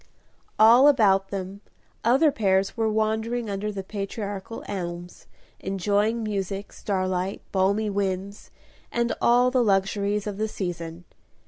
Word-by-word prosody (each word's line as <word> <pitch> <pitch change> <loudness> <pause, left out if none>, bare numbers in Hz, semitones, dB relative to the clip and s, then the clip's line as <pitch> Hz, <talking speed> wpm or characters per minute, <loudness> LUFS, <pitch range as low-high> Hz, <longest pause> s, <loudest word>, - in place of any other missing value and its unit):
All 235 +5 +7
about 195 -8 +4
them 195 0 -6 0.4
other 270 +7 +4
pairs 195 -5 +1
were 225 -2 +1
wandering 220 +1 -1
under 200 +2 -3
the 195 -2 -5
patriarchal 200 +1 -5
elms, 175 -3 -6 0.3
enjoying 205 +4 0
music, 200 -1 -4
starlight, 185 -1 -2
balmy 200 +3 +1
winds, 195 0 -3 0.4
and 235 0 0
all 245 +1 +4
the 255 -1 +3
luxuries 200 0 +1
of 205 -2 -4
the 215 +1 -1
season. 175 -4 -5
200 Hz, 120 wpm, -25 LUFS, 190-220 Hz, 0.4 s, All